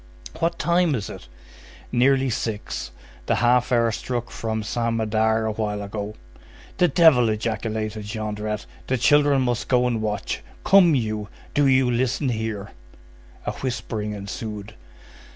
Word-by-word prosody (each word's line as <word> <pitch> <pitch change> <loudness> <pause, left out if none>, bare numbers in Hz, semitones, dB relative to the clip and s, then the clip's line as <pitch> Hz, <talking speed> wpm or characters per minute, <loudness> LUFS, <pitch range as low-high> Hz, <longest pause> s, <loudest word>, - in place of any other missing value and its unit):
"What 170 +1 0
time 170 -3 +2
is 105 -5 -4
it?" - - -10 0.6
"Nearly 130 +1 +3
six. 105 - -3 0.4
The - - +3
half 125 +1 +3
hour 115 -2 +3
struck 120 +1 -4
from 110 -1 -3
Saint 115 +1 -1
Médard 110 0 +1
a - - 0
while 105 -1 -2
ago." 105 +1 -5 0.6
"The 180 - +5
devil!" 140 -7 +5
ejaculated 110 -1 -2
Jondrette; 105 -1 -3 0.2
"the 130 - +1
children 145 +1 +4
must 120 -2 -1
go 125 -1 +3
and 120 -3 0
watch. 105 -2 -2 0.2
Come 180 -5 +6
you, 110 -4 -2 0.2
do 145 -1 +3
you 130 -1 +4
listen 130 +3 0
here." 110 -3 -3 0.7
A - - 0
whispering 110 -4 -3
ensued. 105 +1 -6
115 Hz, 135 wpm, -23 LUFS, 105-130 Hz, 0.7 s, Come